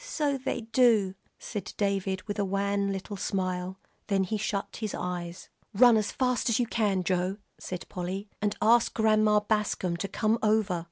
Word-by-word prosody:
"So 300 - -1
they 265 -2 -3
do," 225 -4 +3 0.2
said 205 -5 -6
David, 195 -2 -1
with 205 -1 -5
a - - +2
wan 200 +1 0
little 195 +1 -5
smile. 185 -1 -2 0.3
Then 195 -1 +2
he 190 +3 -2
shut 205 -1 -3
his 215 -3 -3
eyes. 175 -1 -5 0.3
"Run 240 +2 +7
as 215 -1 +1
fast 250 -2 0
as 230 - +2
you 245 - +2
can, 205 -5 0
Joe," 185 +2 0 0.2
said 180 -1 -6
Polly, 185 +3 -4
"and 205 0 0
ask 230 +2 +4
Grandma 215 -1 +4
Bascom 205 -4 0
to 195 - -3
come 220 +3 0
over." 215 -4 +2
205 Hz, 170 wpm, -28 LUFS, 190-220 Hz, 0.3 s, Run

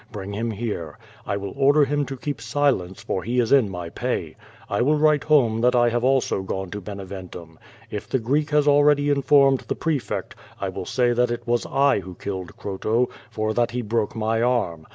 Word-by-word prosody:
Bring 100 -1 -6
him 115 +3 -2
here. 105 -8 -4 0.3
I 100 - -1
will 100 -1 -6
order 140 +2 +4
him 145 0 -1
to 135 - -6
keep 140 -2 -5
silence, 115 -7 0
for 95 - -2
he 120 +6 -1
is 115 -2 +1
in 135 -7 +5
my 90 -2 -6
pay. - - -3 0.3
I 100 - -1
will 150 +5 +3
write 150 -1 +3
home 120 -8 +3
that 125 +1 +3
I 120 -1 +4
also 130 +2 +2
have 95 0 -6
gone 95 -1 -4
to 105 - -5
Beneventum. 95 -4 -9 0.3
If 105 - -6
the - - +1
Greek 140 +6 0
has 150 -1 +2
already 145 0 +4
infonned 140 -1 +3
the - - -1
pre 160 -3 0
fect, - - -5 0.3
I - - -2
will - - -6
say 120 -1 +2
that 125 0 +2
it 120 0 -4
was 120 -1 0
I 140 -4 +3
who 95 -1 -9
killed 95 -2 -6
Croto; 110 +5 -1 0.2
for 110 0 -2
that 120 +1 +1
he 125 0 -3
broke 110 +1 -1
my 110 0 0
arm. 115 -10 0
120 Hz, 210 wpm, -23 LUFS, 100-140 Hz, 0.3 s, in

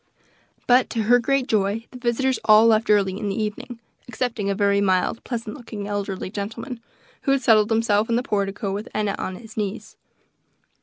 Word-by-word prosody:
But, 250 +1 +4
to 225 - -1
her 245 +3 +5
great 275 +2 +1
joy, 215 0 0
the 250 - -10
visitors 250 +1 0
all 215 +1 +7
left 220 -1 +3
early 200 -2 +2
in 205 - -2
the 195 - -3
evening, 215 +3 -4 0.3
excepting 235 -5 -2
a 200 - 0
very 200 0 +2
mild, 190 +3 +1
pleasant 230 -3 -5
looking, 225 -6 -7
elderly 200 -2 -4
gentleman, 225 +4 -6 0.4
who 275 - 0
had 275 -2 0
settled 215 -2 +4
himself 220 -1 +2
in 230 - +2
the 245 - 0
portico, 200 -2 -2
with 205 +2 -5
Enna 210 -2 0
on 185 - -4
his 225 +2 -12
knees. 210 0 -4
215 Hz, 185 wpm, -23 LUFS, 200-235 Hz, 0.4 s, all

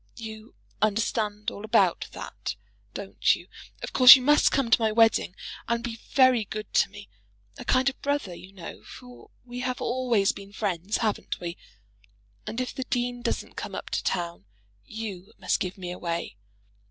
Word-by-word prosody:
You 220 -1 -9 0.3
understand 210 0 0
all 205 - -9
about 220 - +2
that; - - -6 0.4
don't - - +1
you? - - -12 0.4
Of - - -5
course 255 0 +11
you 260 - -1
must 295 +3 +5
come 270 -5 0
to 235 - +5
my 220 -1 +2
wedding, 225 -4 +3 0.3
and 235 0 0
be 235 -1 -4
very 255 -4 +5
good 215 +1 -7
to - - +4
me, 205 -1 -11 0.5
a - - -6
kind 255 +1 +3
of 270 - -1
brother, 285 -10 -1
you 185 +2 -12
know; 190 -3 -9
for 250 -1 -13 0.2
we 245 0 -7
have 250 0 -2
always 240 -5 +1
been 200 0 -11
friends; 195 -1 -1
haven't 215 - -2
we? 170 -1 -5 0.9
And 230 - -4
if 255 - -3
the 260 -1 -4
dean 245 -1 -2
doesn't - - -3
come - - -6
up - - -7
to - - -1
town, 170 - -2 0.4
you 210 -3 -7
must - - 0
give 185 +1 -3
me 180 -2 -5
away. 170 - -4
220 Hz, 175 wpm, -27 LUFS, 195-250 Hz, 0.9 s, course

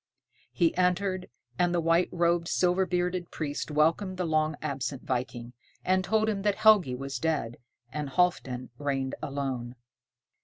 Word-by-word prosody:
He 170 -3 +2
entered, 185 +1 +1 0.3
and 175 0 +2
the - - +2
white 165 +2 +3
robed, 170 -1 +1
silver 180 +1 +2
bearded 180 -1 -1
priest 145 -1 -4
welcomed 165 +6 +1
the 180 - -1
long 155 -1 +1
absent 135 -1 -4
viking, 120 -1 -3 0.3
and 185 0 +2
told 220 +2 +1
him 205 -2 -1
that 205 0 +1
Helgi 210 - +5
was 135 0 -5
dead, 150 -7 -1 0.4
and 150 -2 -3
Halfdan 135 -8 0
reigned 135 -2 -1
alone. 130 -3 -3
165 Hz, 145 wpm, -28 LUFS, 135-180 Hz, 0.4 s, Helgi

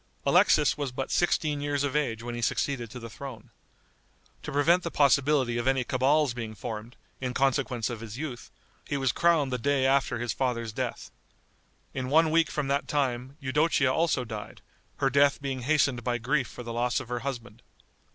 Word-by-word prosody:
Alexis 150 - +4
was 140 -3 -2
but 130 +1 -4
sixteen 155 -4 +1
years 145 -1 -1
of 145 0 -2
age 115 -7 -1
when 120 0 -5
he 120 - -4
succeeded 120 0 -1
to 125 - -8
the 115 - -7
throne. 115 0 -9 0.9
To - - -6
prevent 165 +6 +3
the 170 - -3
possibility 140 -4 +3
of 120 - -2
any 135 -1 +2
cabals 135 +2 +2
being 115 -2 -6
formed, 115 +2 -6 0.2
in 125 -1 -3
consequence 135 -4 +1
of 115 - -5
his 115 0 -8
youth, 135 -5 -6 0.4
he 145 - -1
was 135 -3 +1
crowned 155 -5 +2
the 125 - -1
day 140 +2 +1
after 135 -1 +2
his 120 -1 -2
father's 115 -4 -2
death. - - -4 0.8
In 130 -1 -3
one 160 +2 +4
week 165 -1 +3
from 150 -2 -2
that 140 +1 0
time 130 -1 -1
Eudocia 140 -1 +2
also 155 -5 +1
died, 110 -2 -8 0.3
her 135 -1 +1
death 140 +1 +4
being 135 -2 -3
hastened 135 -2 +1
by 120 0 0
grief 130 +2 0
for 125 - -9
the 115 0 -6
loss 120 +2 0
of 130 -3 -9
her 120 0 -2
husband. 120 -4 -6
130 Hz, 190 wpm, -28 LUFS, 120-145 Hz, 0.9 s, Alexis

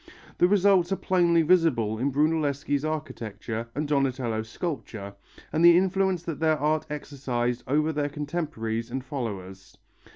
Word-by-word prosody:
The 175 - +6
results 195 -2 +4
are - - +3
plainly 170 -3 +3
visible 145 -11 +2
in 140 +3 0
Brunelleschi's 145 -1 0
architecture 115 -7 -4
and 150 +1 -1
Donatello's 130 -6 -1
sculpture, 115 - -5 0.4
and 160 +2 +2
the 170 0 +8
influence 190 -1 +1
that 165 -3 -5
their 160 -1 +2
art 155 +1 0
exercised 130 -5 -3
over 155 +4 +1
their 145 -1 -1
contemporaries 145 -7 -3
and 130 +1 -4
followers. 95 -8 -6
145 Hz, 135 wpm, -26 LUFS, 120-165 Hz, 0.4 s, the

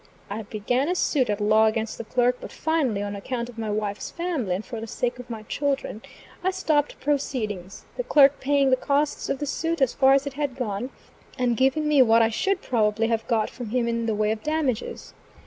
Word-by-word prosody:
I 215 +2 -3
began 230 +7 -1
a 360 - +1
suit 270 -8 +1
at 205 0 0
law 215 +1 +4
against 220 0 -2
the - - -3
clerk; 245 +2 +1
but - - -8
finally, 280 -11 0
on 205 0 -4
account 235 +4 -4
of 230 -2 -10
my 220 -1 -3
wife's 210 -1 -2
family 320 - -2
and 200 - -5
for 230 -3 -6
the 225 - -6
sake 245 +3 -2
of 250 - -10
my 225 -2 -6
children, 275 -3 -2 0.4
I 375 - +3
stopped 310 -6 0
proceedings, 215 -10 -2
the - - -1
clerk 285 - +5
paying 280 -1 +2
the 260 - +5
costs 285 +3 0
of - - 0
the 290 - -3
suit 330 +3 -2
as 265 -3 +2
far 270 -1 +5
as 275 +1 +3
it 280 - -4
had 285 -2 -2
gone, 245 -1 -3 0.5
and 245 -2 +1
giving 270 +5 +2
me 295 -3 +5
what 230 -2 +5
I 225 - +3
should 385 - -1
probably 225 -1 +1
have 225 -1 -1
got 225 -3 +1
from 245 -4 -7
him 240 +1 0
in 230 0 -1
the 220 - 0
way 210 0 +1
of 220 0 -3
damages. 300 -6 -2
245 Hz, 220 wpm, -25 LUFS, 220-280 Hz, 0.5 s, clerk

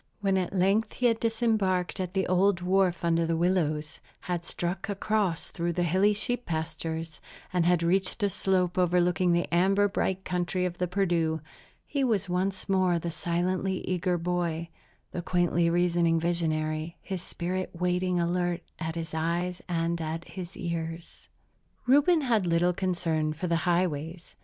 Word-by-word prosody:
When 195 -2 +1
at 185 -2 0
length 195 +4 +2
he 250 - -2
had 230 -2 +3
disembarked 220 -6 0
at 185 0 -3
the 190 - +2
old 185 0 +3
wharf 180 -1 +2
under 165 0 +2
the 165 0 0
willows, 160 -3 0 0.2
had 175 -2 -3
struck 175 +4 -3
across 200 -3 0
through 170 0 -2
the 175 - 0
hilly 190 +5 +3
sheep 245 +4 0
pastures, 160 0 -4 0.3
and 175 -2 +2
had 175 -1 +3
reached 190 +4 +1
a 200 - +3
slope 185 -1 +1
overlooking 180 0 +3
the 170 0 +2
amber 195 +3 +4
bright 190 -1 -1
country 180 0 -1
of 175 0 -4
the 180 - +1
Perdu, 170 -4 +1 0.5
he 280 -2 -1
was 215 -6 +1
once 185 +1 -1
more 185 -3 +2
the 170 0 -3
silently 180 +3 -1
eager 180 0 0
boy, 170 -1 -2 0.4
the 175 - -3
quaintly 175 -1 +2
reasoning 170 -1 +2
visionary, 160 -1 -1
his 190 -3 -5
spirit 185 +1 -3
waiting 180 +1 0
alert 175 0 0 0.2
at 160 -1 -3
his 165 -2 -5
eyes 170 +3 -1
and 170 0 0
at 160 +1 -4
his 185 -1 -8
ears. 165 -1 -5 0.6
Reuben 290 +6 +5
had 225 -9 +1
little 170 +1 +3
concern 170 -4 0
for 160 +4 -5
the 170 -1 +1
highways. 170 -1 -1
175 Hz, 155 wpm, -28 LUFS, 170-190 Hz, 0.6 s, Reuben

